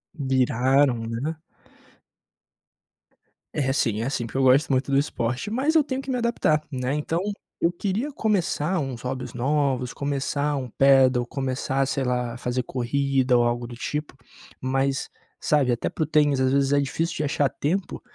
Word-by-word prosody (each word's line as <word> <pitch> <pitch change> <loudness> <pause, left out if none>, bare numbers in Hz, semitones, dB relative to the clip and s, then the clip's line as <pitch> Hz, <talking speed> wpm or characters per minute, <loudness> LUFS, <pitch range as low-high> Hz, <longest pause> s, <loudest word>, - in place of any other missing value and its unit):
Viraram, 130 -2 +2
né? 135 +8 -3 2.2
É 135 -3 +1
sim, 115 -5 0
é 125 - -1
sim, 120 -4 -2
porque 125 - -6
eu - - +3
gosto 135 +3 +4
muito 130 +1 +1
do 135 - +4
esporte, 135 - -1
mas 280 +7 +1
eu 310 - +6
tenho 265 -1 -3
que 270 - -10
me 255 - 0
adaptar, 230 -10 +1
né. 130 0 -2
Então 160 +3 -1 0.4
eu 170 - +3
queria 205 +10 -2
começar 190 - 0
uns 130 -5 -4
hobbies 125 -1 -4
novos, 130 -1 0
começar 145 +1 -1
um 130 -2 -3
Padel, 135 -2 +5
começar, 135 +1 -1
sei 135 0 -1
lá, 125 -1 -1
fazer 125 +1 -2
corrida 130 0 +1
ou 120 - +4
algo 120 0 -1
do 120 - -9
tipo. 150 +4 -4 0.4
Mas, 135 +1 0 0.3
sabe, 140 -4 +2
até 120 - -1
para 160 - -2
o - - 0
tênis, 150 -3 +3
às 130 0 +2
vezes 140 0 +2
é 140 - +4
difícil 160 +4 -2
de 150 - -2
achar 140 0 +1
tempo, 175 +8 -2
135 Hz, 170 wpm, -24 LUFS, 125-150 Hz, 2.2 s, eu